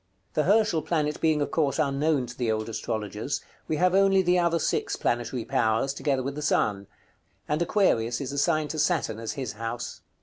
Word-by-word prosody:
The 155 - +1
Herschel 205 -5 +3
planet 150 -1 -1
being 155 -2 +3
of - - -5
course 150 -4 +1
unknown 145 -2 +1
to 120 +1 -9
the 120 -3 0
old 110 0 -2
astrologers, 110 +2 -3 0.3
we 155 - 0
have 180 +3 +2
only 195 0 +4
the 180 0 +3
other 170 -1 +2
six - - -1
planetary 120 0 -1
powers, 115 +4 +1
together 140 -2 -1
with 135 +2 -3
the 150 - -6
sun; 100 -9 +1 0.6
and 150 +2 0
Aquarius 120 - +2
is 140 -1 -4
assigned 155 +1 +1
to 155 - -4
Saturn 150 -9 +1
as 115 -1 -4
his 130 -5 -4
house. 115 +2 -5
140 Hz, 190 wpm, -26 LUFS, 115-160 Hz, 0.6 s, only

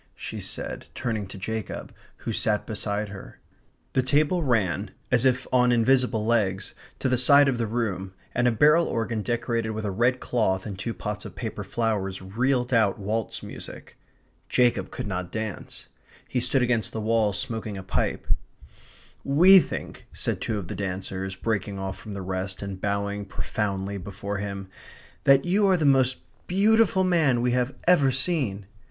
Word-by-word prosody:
she - - -6
said, - - -6
turning 110 -5 -2
to 95 - -10
Jacob, 110 +2 -5 0.3
who 115 - -1
sat 105 0 0
beside 105 -1 -2
her. 100 -1 -10 0.6
The 130 - +3
table 145 +7 +2
ran, 105 - +1 0.2
as 125 0 +3
if 130 0 +2
on 125 -1 +5
invisible 120 -2 +3
legs, 100 -5 0 0.2
to - - -1
the 125 -1 +2
side 140 +2 +6
of 130 -3 0
the 115 - 0
room, 95 -5 -2 0.2
and 120 0 +2
a - - +4
barrel 150 +8 +5
organ 115 -1 -1
decorated 115 0 -1
with 110 0 -4
a 100 - -1
red 120 +6 +2
cloth 95 -6 0
and 105 -3 -5
two 115 - -3
pots 105 0 -4
of - - -9
paper 110 -3 -4
flowers 95 -2 -1
reeled 125 +6 0
out 110 -4 +3
waltz 110 +2 -3
music. - - -9 0.5
Jacob 125 -1 +2
could - - -5
not 90 -3 -4
dance. 110 -3 -5 0.4
He 125 - -1
stood 125 +1 +2
against 120 -3 0
the 110 - -3
wall 110 -1 +2
smoking 105 +1 -2
a 95 - -6
pipe. 95 - -1 1.0
"We 180 +8 +8
think," - - -5
said - - -2
two 110 - -1
of 95 -4 -5
the - - -5
dancers, 95 0 -4
breaking 100 -1 -2
off 95 0 -4
from 105 -2 -8
the 95 - -5
rest, 95 +1 -4
and 95 -1 -6
bowing 100 0 -1
profoundly 100 -1 -3
before 100 +2 -5
him, 100 -1 -5 0.6
"that 135 0 +6
you 200 +3 +3
are 190 -1 +4
the 155 - 0
most 130 -2 +4 0.3
beautiful 200 0 +4
man 160 -9 +3
we 125 +1 +1
have 125 +1 0
ever 170 -7 +5
seen." 130 - 0
110 Hz, 170 wpm, -26 LUFS, 100-130 Hz, 1.0 s, We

